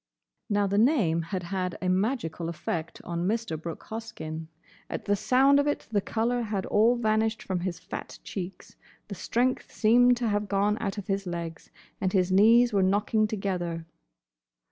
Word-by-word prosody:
Now 205 -1 +2
the 200 +1 +1
name 215 - +3
had 175 +2 -4
had 180 0 -3
a 185 - -2
magical 185 -3 0
effect 165 0 -4
on 170 +1 -2
Mr. 225 -5 -1
Brooke 165 +1 -7
Hoskyn. 160 -8 -6 0.4
At - - -5
the 205 - +2
sound 265 +7 +4
of 285 - +1
it 290 - -1
the 205 -2 +2
colour 235 +4 0
had 210 -4 -2
all 225 +4 +4
vanished 220 -1 0
from 185 -2 -2
his 175 -1 -3
fat 180 +1 -8
cheeks, 185 -1 -7 0.3
the - - -4
strength 245 +6 -1
seemed 245 +2 +4
to 240 -1 -1
have 205 -1 0
gone 205 +2 +1
out 200 -2 -2
of 205 - -5
his 195 -1 -2
legs, 170 -2 -5 0.3
and 185 -1 0
his 185 -2 +2
knees 230 +5 +6
were 200 - +3
knocking 205 +3 +2
together. 180 -5 -3
200 Hz, 170 wpm, -27 LUFS, 180-225 Hz, 0.4 s, knees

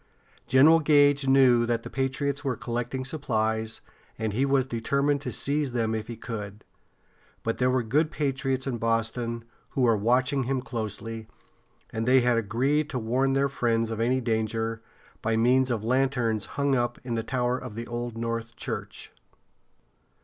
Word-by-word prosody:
General 150 +5 +6
Gage 145 -2 +4
knew 130 -3 +5
that 115 -1 0
the - - -7
patriots 140 +2 -1
were 130 -4 -1
collecting 120 +3 -3
supplies, 110 -6 -2 0.4
and 110 -2 -2
he 135 +6 +1
was 135 -2 +3
determined 140 +4 0
to - - -4
seize 140 -2 0
them 115 -2 0
if 110 -1 -3
he 115 - -7
could. 105 -3 -7 0.8
But 115 - -2
there 125 0 +3
were 130 -1 +1
good 150 +8 +1
patriots 135 -3 -1
in 125 -4 -3
Boston 115 +1 -1 0.3
who 135 - -2
were 115 -3 +4
watching 125 +5 +1
him 135 +1 0
closely, 115 -1 -5 0.6
and 115 +1 -3
they 130 0 +6
had 120 -1 +2
agreed 130 +8 +1
to - - -3
warn 125 +4 +1
their 135 +1 +2
friends 115 -4 0
of 110 - -4
any 125 +3 +1
danger, 115 -1 -1 0.4
by 110 0 0
means 125 +3 +3
of 115 -4 -1
lanterns 125 -4 +1
hung 140 -1 +2
up 120 -1 0
in 125 -2 -4
the 115 - 0
tower 125 +1 -1
of 105 - -8
the 115 +1 -5
Old 120 -1 -5
North 115 0 -3
Church. - - -6
120 Hz, 165 wpm, -27 LUFS, 115-135 Hz, 0.8 s, General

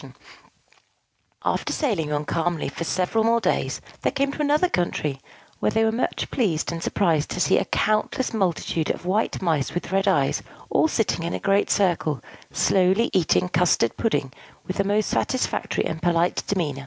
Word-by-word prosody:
After - - 0
sailing 195 - -1
on 150 0 -1
calmly 165 -2 -1
for 155 - -5
several 185 +6 0
more 230 +1 +3
days, - - -1 0.2
they - - +2
came 275 0 0
to 300 - -5
another 300 +4 +3
country, 155 - -1 0.4
where - - +1
they 225 - +2
were 220 - +3
much 230 +3 -2
pleased 175 - 0
and 165 -1 -5
surprised 165 -7 +1
to - - -4
see 185 - +3
a - - -2
countless 215 +4 0
multitude 175 -5 -1
of - - -3
white 190 +1 0
Mice 160 -5 0
with 175 - -4
red 195 0 +1
eyes, - - +2 0.3
all - - +4
sitting 225 - 0
in 170 - -2
a - - -3
great 200 +1 +2
circle, 170 - +1 0.3
slowly 190 +5 +2
eating 180 -1 +2
custard 170 -10 +2
pudding 145 - -1 0.3
with 185 - -4
the 200 - +2
most 205 +1 +1
satisfactory 255 - -1
and 160 - -4
polite 175 0 +2
demeanor. 160 -8 -1
185 Hz, 170 wpm, -24 LUFS, 165-220 Hz, 0.4 s, all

